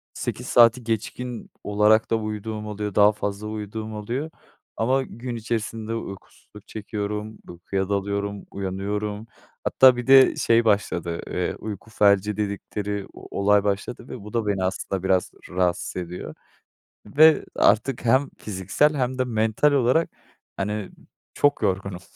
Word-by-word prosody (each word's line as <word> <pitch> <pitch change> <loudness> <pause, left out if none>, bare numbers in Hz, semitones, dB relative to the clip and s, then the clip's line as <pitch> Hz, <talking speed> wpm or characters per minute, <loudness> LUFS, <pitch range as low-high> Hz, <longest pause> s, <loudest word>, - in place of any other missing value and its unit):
8 - - -4
saati 120 +1 +5
geçkin 115 +2 -4
olarak 105 +2 +3
da - - +4
uyuduğum 110 0 -4
oluyor. 105 -1 -4
Daha 105 0 +6
fazla 105 0 -4
uyuduğum 110 +1 -5
oluyor. 120 +9 -3 0.5
Ama 130 +5 +2
gün 120 0 -7
içerisinde 115 -1 -3
uykusuzluk 105 0 -10
çekiyorum, 105 0 -5
uykuya 95 +2 -3
dalıyorum, 100 0 -2
uyanıyorum. 105 +3 -3 0.4
Hatta 130 -1 +6
bir 125 - -5
de 135 0 +7
şey 115 0 +3
başladı, 85 -5 0
ııı, 90 -1 -2
"uyku 110 0 -7
felci" 105 0 +3
dedikleri 100 -1 -3
o - - -8
olay 100 0 +4
başladı 105 +4 -3
ve 125 - -7
bu 105 - -10
da 115 -3 0
beni 100 -2 0
aslında 95 0 -2
biraz 95 -1 +1 0.2
rahatsız 90 -1 -1
ediyor 90 0 -6 0.7
ve 155 +8 +5
artık 115 +3 +2
hem 130 +4 +3
fiziksel 105 - +1
hem 130 -1 -1
de 130 - +2
mental 110 +4 +2
olarak, 140 +4 +2 0.5
hani, 105 0 -3 0.4
çok 145 -3 +2
yorgunum 95 -2 -1
105 Hz, 135 wpm, -24 LUFS, 100-115 Hz, 0.7 s, de